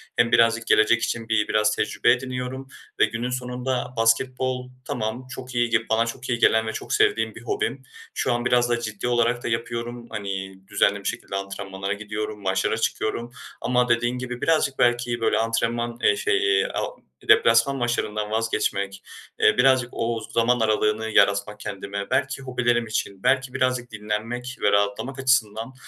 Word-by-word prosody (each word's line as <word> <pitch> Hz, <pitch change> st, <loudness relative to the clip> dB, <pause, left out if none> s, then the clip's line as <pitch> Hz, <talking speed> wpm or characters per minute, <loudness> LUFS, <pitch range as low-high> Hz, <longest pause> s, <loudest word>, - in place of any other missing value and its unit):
hem 120 Hz, 0 st, +3 dB
birazcık 115 Hz, 0 st, +3 dB
gelecek 115 Hz, +1 st, +4 dB
için 115 Hz, -1 st, -3 dB
bi 110 Hz, -2 st, +2 dB
biraz 105 Hz, 0 st, +2 dB
tecrübe 120 Hz, -, +2 dB
ediniyorum 130 Hz, +1 st, -3 dB, 0.3 s
ve -, -, +7 dB
günün 120 Hz, +2 st, -3 dB
sonunda 125 Hz, 0 st, -3 dB
basketbol, 125 Hz, +2 st, +1 dB, 0.2 s
tamam, 110 Hz, +4 st, -3 dB
çok 130 Hz, -1 st, -8 dB
iyi 120 Hz, 0 st, +2 dB
g -, -, 0 dB
bana 110 Hz, +1 st, +3 dB
çok 125 Hz, +3 st, -6 dB
iyi 120 Hz, -2 st, 0 dB
gelen 110 Hz, -1 st, +4 dB
ve 110 Hz, -, -3 dB
çok -, -, -5 dB
sevdiğim 420 Hz, -1 st, +2 dB
bir -, -, -10 dB
hobim. 415 Hz, +1 st, -2 dB, 0.3 s
Şu -, -, 0 dB
an 120 Hz, 0 st, -2 dB
biraz 120 Hz, 0 st, +3 dB
da 120 Hz, 0 st, +1 dB
ciddi 110 Hz, 0 st, -4 dB
olarak 120 Hz, 0 st, +1 dB
da -, -, -2 dB
yapıyorum. 120 Hz, +1 st, -3 dB
Hani, 95 Hz, -3 st, -4 dB
düzenli 100 Hz, +1 st, +2 dB
bir -, -, -14 dB
şekilde 120 Hz, -4 st, -4 dB
antrenmanlara 100 Hz, 0 st, -4 dB
gidiyorum, 105 Hz, 0 st, -5 dB
maçlara 95 Hz, +2 st, 0 dB
çıkıyorum 115 Hz, +1 st, -2 dB, 0.3 s
ama 125 Hz, 0 st, +1 dB
dediğin 120 Hz, +1 st, +1 dB
gibi 125 Hz, -1 st, -5 dB
birazcık 155 Hz, -4 st, +1 dB
belki, 120 Hz, 0 st, +2 dB
böyle, 110 Hz, -1 st, +2 dB
antrenman, 115 Hz, +1 st, -1 dB
eee, -, -, +5 dB
şey, 415 Hz, -1 st, +2 dB
a -, -, -3 dB, 0.5 s
deplasman 115 Hz, +4 st, +5 dB
maçlarından 110 Hz, -4 st, -1 dB
vazgeçmek, 100 Hz, -3 st, -1 dB, 0.4 s
eee, -, -, +4 dB
birazcık 130 Hz, -1 st, +4 dB
o 115 Hz, -1 st, -2 dB
zaman 120 Hz, +1 st, +2 dB
aralığını 110 Hz, 0 st, +1 dB
yaratmak 100 Hz, 0 st, +2 dB
kendime, 100 Hz, -1 st, -5 dB
belki 135 Hz, +1 st, 0 dB
hobilerim 120 Hz, -2 st, 0 dB
için, 100 Hz, -3 st, -3 dB
belki 130 Hz, 0 st, +2 dB
birazcık 125 Hz, -1 st, 0 dB
dinlenmek 110 Hz, +4 st, -4 dB
ve 105 Hz, -, +3 dB
rahatlamak 100 Hz, +6 st, 0 dB
açısından 125 Hz, -2 st, +1 dB
120 Hz, 160 wpm, -24 LUFS, 110-125 Hz, 0.5 s, ve